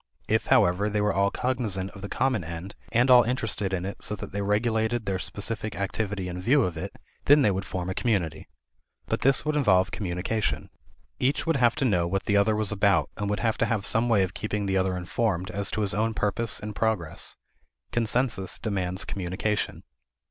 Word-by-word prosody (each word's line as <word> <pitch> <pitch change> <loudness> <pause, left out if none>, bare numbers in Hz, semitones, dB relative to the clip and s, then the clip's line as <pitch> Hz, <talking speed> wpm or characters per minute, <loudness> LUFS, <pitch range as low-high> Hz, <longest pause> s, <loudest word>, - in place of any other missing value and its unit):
If, - - +1
however, 90 +4 +3
they 105 0 -1
were 105 -1 +2
all 100 +1 +2
cognizant 105 -7 -2
of 100 - -12
the 100 - -6
common 130 -7 0
end 85 +4 -7 0.2
and 120 +3 +3
all 125 -1 +9
interested 115 -4 -1
in 95 -1 -2
it 100 - -6
so 105 - 0
that 95 - -8
they 100 +2 -3
regulated 110 +2 0
their 95 -1 -1
specific 110 +2 -3
activity 100 -1 -2
in 90 0 -5
view 130 +7 +4
of 90 -5 -2
it, 80 - -6 0.3
then 145 0 +6
they 105 - +4
would 95 +1 -3
form 90 -1 -4
a 95 - -2
community. 95 -9 -1 0.6
But - - -2
this 135 +2 +4
would 155 0 0
involve 100 -10 +3
communication. 95 +2 -2 0.5
Each 135 +3 +1
would 165 -3 +2
have 120 -3 +3
to 140 - 0
know 90 -8 +2
what 95 +2 -1
the 105 - +1
other 100 +2 +3
was 105 -1 +1
about 100 -1 +2
and 100 -1 -3
would 105 - -1
have 110 -2 0
to - - +2
have 110 -3 -1
some 115 +2 +2
way 105 -4 +4
of 95 +1 -3
keeping 105 -1 -3
the 95 -1 0
other 95 -1 +1
informed 90 0 -1
as 100 0 -1
to 110 - -1
his 100 -1 +1
own 110 +1 0
purpose 110 +2 +1
and 105 0 -6
progress. 110 -8 -2 0.5
Consensus 115 -4 0
demands 95 -3 -2
communication. 100 +3 -2
105 Hz, 205 wpm, -26 LUFS, 95-115 Hz, 0.6 s, all